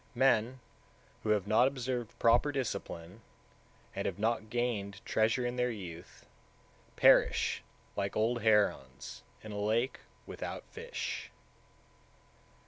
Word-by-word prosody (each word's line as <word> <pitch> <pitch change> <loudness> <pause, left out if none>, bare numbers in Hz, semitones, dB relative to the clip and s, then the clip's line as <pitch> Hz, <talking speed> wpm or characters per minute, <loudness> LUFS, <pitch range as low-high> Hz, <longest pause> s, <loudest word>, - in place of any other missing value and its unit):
155. 120 -2 +3
Men - - -18 0.6
who 110 - -3
have 105 -3 +3
not 110 +5 +5
observed 125 -3 -3
proper 120 +5 +4
discipline, 100 -7 -4 0.7
and - - -1
have - - -3
not 110 0 0
gained 110 -5 -1
treasure 110 +3 +2
in 120 +1 -2
their 125 0 +2
youth, 90 -7 -8 0.7
perish - - +4 0.3
like 100 -1 -2
old 115 +2 +1
herons 105 - +1 0.2
in 110 - -7
a 105 - -4
lake 115 +5 +1 0.3
without - - -6
fish. 475 +2 -5
110 Hz, 120 wpm, -32 LUFS, 105-125 Hz, 0.7 s, not